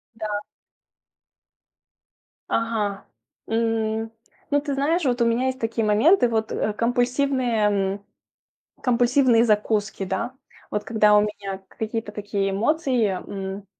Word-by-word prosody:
Да. 215 -2 -3 2.1
Ага. 215 -3 -1 0.4
М. 225 -1 0 0.4
Ну, 290 0 +3
ты 285 -1 -3
знаешь, 310 +6 +1
вот 245 -2 +1
у - - +4
меня 235 +3 +1
есть 260 0 -2
такие 225 -1 -1
моменты, 245 - +4
вот, 220 -1 -1
э, 215 - -1
компульсивные, 245 +2 +1 0.4
м, 200 0 -10 0.8
компульсивные 245 -1 +4
закуски, 210 -2 0
да. 190 +6 -3 0.4
Вот 210 - -2
когда 215 -2 +4
у - - +6
меня 200 -2 -4
какие-то 220 -1 -4
такие 205 -1 -2
эмоции, 250 +3 +1
м, 195 +1 -5
225 Hz, 115 wpm, -23 LUFS, 210-245 Hz, 2.1 s, у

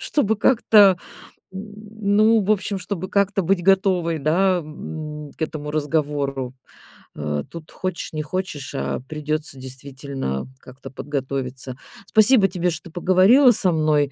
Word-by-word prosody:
чтобы 220 -7 +1
как-то, 210 -5 +5 0.5
н 205 +1 -4
ну, 220 +1 +5
в 200 - -1
общем, 200 -1 -2
чтобы 185 0 -5
как-то 200 0 +1
быть 175 +1 +1
готовой, 185 -3 +2
да, 180 +5 +2
м, 150 -1 -8
к - - -6
этому 150 -1 -4
разговору. 145 -4 -1 0.6
Э, 75 -1 -3
тут 165 -2 -10
хочешь 185 -3 -5
не 155 - -2
хочешь, 150 -4 -5
а 70 - -2
придётся 150 -2 -3
действительно 130 - -5
как-то 130 0 -12
подготовиться. 135 -2 -4 0.3
Спасибо 215 -1 +5
тебе, 180 -1 -1
что 165 +1 -8
поговорила 190 - +5
со 190 -5 +2
мной. 155 -3 +2
165 Hz, 130 wpm, -22 LUFS, 145-195 Hz, 0.6 s, как-то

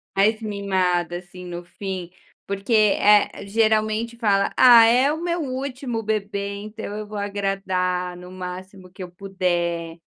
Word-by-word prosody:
Mais 210 +3 +3
mimada, 185 -4 0
assim, 180 0 -11
no 175 -1 -7
fim, 185 -1 -6 0.3
porque, 200 +3 -5
eh, 210 -1 +4
geralmente 220 +2 +1
fala: 200 -4 +1
"Ah, 240 -3 +8
é 250 +5 +4
o 315 - -3
meu 345 0 -1
último 255 -3 -4
bebê, 200 -1 -2
então 215 +1 -8
eu 215 0 -6
vou 210 0 -7
agradar 190 -3 -2
no 180 +1 -11
máximo 185 0 -8
que 190 - -12
eu 180 - -8
puder". 175 -3 -2
200 Hz, 140 wpm, -23 LUFS, 180-220 Hz, 0.3 s, Ah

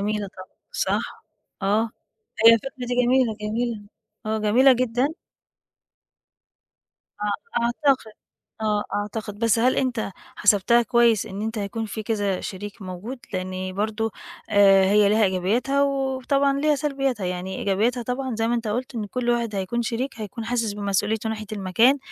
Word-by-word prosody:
جميلة 210 0 -1
طبعًا، 185 0 -12 0.2
صح، - - -2 0.4
آه، 215 +3 +1 0.6
هي 230 - +10
الفكرة 230 +4 -2 0.2
دي 245 - -1
جميلة، 245 -3 +2
جميلة 225 +1 -2 0.4
آه، 220 0 0
جميلة 235 +6 +5
جدًا. 250 +1 +1 2.1
آه 235 - -2
أعتقد، 245 -2 +1 0.5
آه 210 -1 +1
أعتقد، 205 0 -4
بس 230 0 +2
هل 250 +3 +3
أنت 245 -6 -1 0.3
حسبتها 205 +4 +4
كويس 235 -3 +3
إن 195 +2 -6
أنت 225 0 -3
هيكون 210 +2 -3
فيه 220 +1 -5
كذا 205 -4 -1
شريك 205 +2 -7
موجود، 190 +8 -6
لإن 185 0 -3
برضه 215 +2 -1 0.4
آآ، 195 -2 +6
هي 205 +1 +4
لها 215 +1 +4
إيجابياتها 210 +9 +1
وطبعًا 275 0 +1
ليها 305 0 +3
سلبياتها، 270 -7 -1
يعني 180 +1 -4
إيجابياتها 225 +6 +1
طبعًا 250 +1 -3
زي 225 +1 0
ما 240 - +1
أنت 230 -2 -2
قلت 245 +5 -3
إن 220 -3 -2
كل 240 +3 -1
واحد 235 -3 0
هيكون 200 +5 -1
شريك 240 +4 -2
هيكون 215 +2 -6
حاسس 230 -2 -1
بمسؤوليته 205 +2 -1
ناحية 215 -1 -5
المكان، 215 +7 +3
220 Hz, 145 wpm, -24 LUFS, 205-245 Hz, 2.1 s, هي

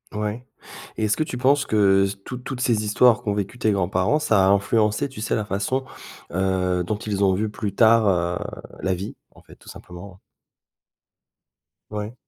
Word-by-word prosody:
Ouais. 105 +3 -3 0.5
Et 110 - 0
est-ce 105 - +1
que 155 - +1
tu 125 - -6
penses 140 +3 +3
que 100 -2 +3 0.2
toutes 125 -1 -7
toutes 135 -2 -5
ces 115 -4 +1
histoires 120 +3 +4
qu'ont 105 -4 -1
vécues 105 +4 -4
tes 110 -2 +2
grands-parents, 95 +5 +1
ça 110 -11 +3
a - - +4
influencé, 105 +4 +2
tu 130 -5 -10
sais, 115 - -1
la 105 - -2
façon, 105 +7 -2 0.5
heu, 90 -1 0
dont 105 +4 -2
ils 100 -2 -2
ont 95 - +4
vu, 105 +2 -1
plus 105 -2 -5
tard, 115 -1 +5
heu, 90 -2 +1 0.4
la 95 - 0
vie, 95 +3 -7 0.2
en - - -17
fait, - - -16
tout - - -17
simplement, 90 +2 -11
hein? - - -23 1.7
Ouais. 105 +1 -5
105 Hz, 185 wpm, -23 LUFS, 95-115 Hz, 1.7 s, tard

